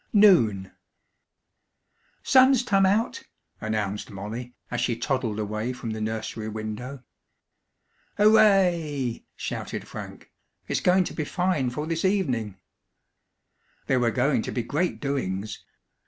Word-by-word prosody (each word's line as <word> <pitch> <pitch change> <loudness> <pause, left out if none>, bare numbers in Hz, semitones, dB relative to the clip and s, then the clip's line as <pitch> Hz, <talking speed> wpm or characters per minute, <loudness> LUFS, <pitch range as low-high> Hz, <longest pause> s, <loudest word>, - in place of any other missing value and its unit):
NOON 120 - +5 1.5
"Sun's 260 -1 +5
tum 195 -5 +3
out!" 210 +4 +1 0.4
announced 105 -2 -2
Molly, 115 +5 -7 0.2
as 120 0 -1
she 125 -1 +1
toddled 125 -4 -1
away 110 +3 -2
from 125 -2 -5
the 110 0 -4
nursery 110 0 -3
window. 110 +5 -6 1.1
"Hooray!" 180 - +3
shouted - - -5
Frank. - - -9 0.4
"It's - - 0
going 185 +1 +4
to - - -6
be 155 - -2
fine 170 -5 0
for 150 +5 -4
this 165 0 -2
evening!" 130 - 0 1.3
There 130 -2 +2
were 120 -1 +2
going 130 +2 +1
to - - -5
be 120 - -2
great 155 +9 -1
doings. 110 -8 -3
125 Hz, 120 wpm, -26 LUFS, 110-180 Hz, 1.5 s, NOON